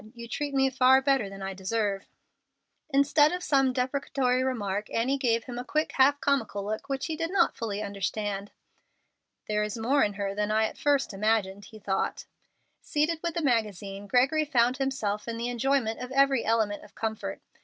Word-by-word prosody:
You 235 0 -8
treat 285 +4 -3
me 270 0 +4
far 260 0 +5
better 265 -6 +1
than 195 0 -9
I 195 0 -3
deserve." 195 +1 -2 0.8
Instead 290 +1 +4
of 360 0 -4
some 270 -2 +3
deprecatory 255 0 0
remark, 210 -5 -2
Annie 260 +5 0
gave 230 -3 +1
him 245 -2 -6
a - - -4
quick, 305 +4 -1
half 280 +2 +4
comical 225 -9 0
look 215 +5 -4
which 270 0 -2
he 320 - -3
did 330 +1 -2
not 360 -2 +2
fully 215 -2 -3
understand. 200 0 -3 1.0
"There 210 0 0
is 210 +1 -3
more 260 +6 +2
in 205 - 0
her 200 0 -3
than 210 +1 -1
I 220 +1 +3
at - - -4
first 285 -6 +1
imagined," 205 -1 0
he 215 - -13
thought. 195 -2 -2 0.6
Seated 310 +2 0
with 340 -2 -3
the 335 - -1
magazine, 205 -5 -1
Gregory 265 +8 +3
found 255 -4 +2
himself 250 -7 -2
in 230 0 -3
the 235 +1 -2
enjoyment 245 -2 0
of 250 0 -6
every 275 -2 +3
element 220 -2 0
of - - -17
comfort. 220 -1 -4
240 Hz, 185 wpm, -28 LUFS, 210-275 Hz, 1.0 s, far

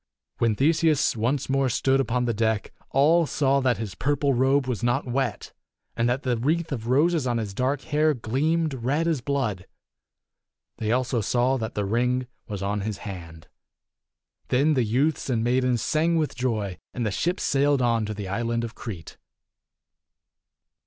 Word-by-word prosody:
When 115 -2 +2
Theseus 155 +2 +2
once 120 +5 0
more 135 0 +1
stood 135 +3 +2
upon 125 -1 0
the 120 - 0
deck, 110 -1 -1 0.2
all 160 +4 +4
saw 140 -1 +2
that 130 -3 +1
his 105 -4 -5
purple 140 - 0
robe 135 +2 +2
was 125 -4 -3
not 120 +4 +1
wet, 125 -1 -2 0.4
and 115 +1 +1
that 125 +3 -1
the 125 -2 0
wreath 160 +7 0
of 115 -4 -4
roses 150 +3 +2
on 120 -1 0
his 105 -3 -3
dark 130 +6 0
hair 155 0 +1
gleamed 150 +7 0
red 135 +6 -1
as 160 -6 0
blood. 120 -9 -2 1.1
They 110 -1 -1
also 125 -1 +1
saw 125 +5 +1
that 110 -2 -5
the 105 - -1
ring 125 +4 0 0.2
was 100 -4 -5
on 100 +1 -1
his 105 0 -3
hand. 85 -4 -8 1.0
Then 140 +5 +3
the 130 -4 +2
youths 135 +8 0
and 115 -3 +1
maidens 125 -1 +1
sang 165 +2 +1
with 155 -2 0
joy, 110 -7 -2 0.2
and 120 - -1
the 105 - 0
ship 175 - -1
sailed 140 -1 +2
on 115 -2 +2
to 110 - -4
the 100 -2 -5
island 115 +4 -1
of 115 0 -5
Crete. 95 -11 -8
125 Hz, 170 wpm, -25 LUFS, 115-140 Hz, 1.1 s, all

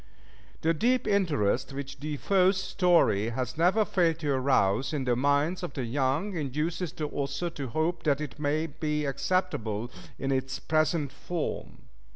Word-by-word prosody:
The 165 +1 +2
deep 245 +10 +1
interest 145 - +1
which 135 0 -6
De 150 +1 -4
Foe's 190 +3 +3
story 175 - +3
has 125 +1 -3
never 185 +7 +3
failed 170 -5 +2
to 145 -3 0
arouse 130 -2 +2
in 145 -3 -1
the 125 -1 +1
minds 145 +7 +1
of 175 -6 -5
the 130 - -2
young, 140 - 0
induces 155 +3 -2
the 155 - -4
author 140 +4 -3
to 140 -5 -5
hope 160 +7 -1
that 145 -2 +1
it 150 -1 -6
may 150 +2 0
be 150 -1 -2
acceptable 125 - -1 0.3
in 135 - -2
its 135 0 -1
present 155 -2 +1
form. 165 +4 -5
150 Hz, 160 wpm, -28 LUFS, 135-170 Hz, 0.3 s, Foe's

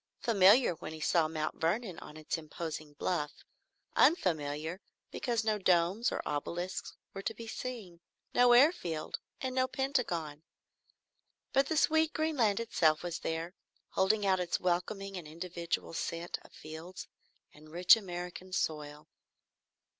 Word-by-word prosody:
Familiar 210 0 +5
when 160 -1 -8
he 160 - -8
saw 160 +1 +3
Mount 155 -1 -4
Vernon 185 +3 0
on 150 - -11
its 155 - -3
imposing 155 -1 -6
bluff; 150 -1 -3 0.5
unfamiliar 160 - +2 0.3
because 235 -3 -1
no 215 -1 +1
domes 185 +5 +2
or - - -4
obelisks 175 +5 -3 0.2
were 195 - -5
to 225 - -3
be 230 - -8
seen; 220 -7 -6 0.3
no 245 0 +6
airfield, 240 - +3 0.2
and 260 -1 -2
no 255 0 +2
Pentagon. 225 - -1 1.1
But 275 0 +4
the 320 - 0
sweet 315 +1 +3
green 315 -1 -1
land 215 -4 +3
itself 160 -9 +2
was 175 -2 -3
there, 165 +2 -3 0.4
holding 205 +2 +2
out 190 -1 +3
its 175 -1 -1
welcoming 190 +2 -1
and 170 -4 -7
individual 170 +1 -4
scent 170 +1 -3
of - - -18
fields 160 +4 -9 0.5
and 155 +1 -16
rich 175 +6 +7
American 180 -2 -6
soil. 150 -2 -2
180 Hz, 140 wpm, -32 LUFS, 160-225 Hz, 1.1 s, rich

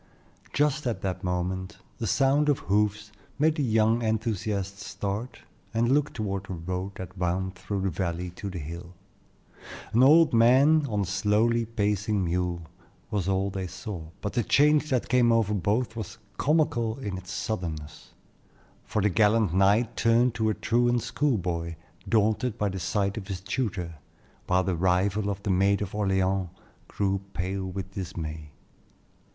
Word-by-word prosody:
Just 150 -1 +1
at 110 -5 -2
that 95 0 -3
moment 90 +1 -2 0.2
the - - -2
sound 140 +2 +3
of 145 - +3
hoofs 105 +1 0 0.3
made 155 +2 +3
the 155 - -2
young 110 -2 +3
enthusiasts 105 -3 -2
start 110 +4 -4 0.3
and 120 +2 +2
look 145 +1 +2
toward 100 -3 -3
the 95 - -5
road 90 +3 -4
that 95 0 -8
wound 95 +1 -1
through 95 +2 -4
the 95 0 0
valley 90 0 -3
to 100 +3 -6
the 90 - -6
hill. 85 +3 -7 1.0
An 120 - +4
old 155 +3 +6
man 135 +6 +5
on 105 -2 0
a - - 0
slowly 105 +5 +2
pacing 105 -2 0
mule 85 0 -1 0.5
was 100 -3 -1
all 95 +1 +1
they 95 -1 -4
saw, 90 -2 -7
but 100 - -3
the 120 - +2
change 150 +6 +3
that 130 -3 0
came 120 -2 +4
over 115 -3 +2
both 105 +5 0
was 110 -1 -6 0.2
comical 145 -7 +1
in 105 -8 -4
its 90 -1 -8
suddenness; 80 -8 -5 0.7
for 105 - -1
the 105 - +4
gallant 105 -1 +3
knight 105 +5 +3
turned 115 +1 +3
to 110 -2 0
a 110 - 0
truant 120 0 +1
school 145 -5 +1
boy, 85 -2 -3 0.3
daunted 110 +1 +1
by 105 -2 0
the 95 0 -4
sight 100 +3 -1
of 100 -3 -6
his 95 -3 -4
tutor, 95 - -3 0.5
while 90 0 +3
the 95 -1 0
rival 95 +4 +1
of 100 0 -4
the 100 - 0
Maid 100 +2 +3
of 100 -2 -4
Orleans 95 -2 +1 0.4
grew 100 -1 -1
pale 95 +1 -2
with 95 0 -5
dismay. 80 -5 -6
100 Hz, 160 wpm, -27 LUFS, 95-115 Hz, 1.0 s, old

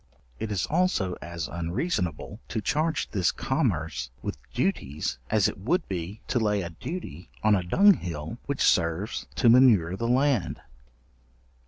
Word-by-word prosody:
It 110 - -3
is 95 -4 0
also 155 - +1
as 85 -1 -5
unreasonable 90 - -3
to 115 - -2
charge 155 +8 0
this 95 -5 +2
commerce 90 - -1
with - - -3 0.2
duties 80 - -2
as 105 -3 +3
it - - -5
would 170 - 0
be 95 +3 -5
to 120 - +2
lay 105 -3 +1
a 85 - -6
duty 90 - -7
on 110 0 +5
a 100 - +3
dunghill 90 - +2
which 140 -1 -2
serves 85 +5 +1
to - - +2
manure 115 -8 +6
the 115 +4 -2
land. 130 -5 +1
105 Hz, 145 wpm, -27 LUFS, 85-130 Hz, 0.2 s, manure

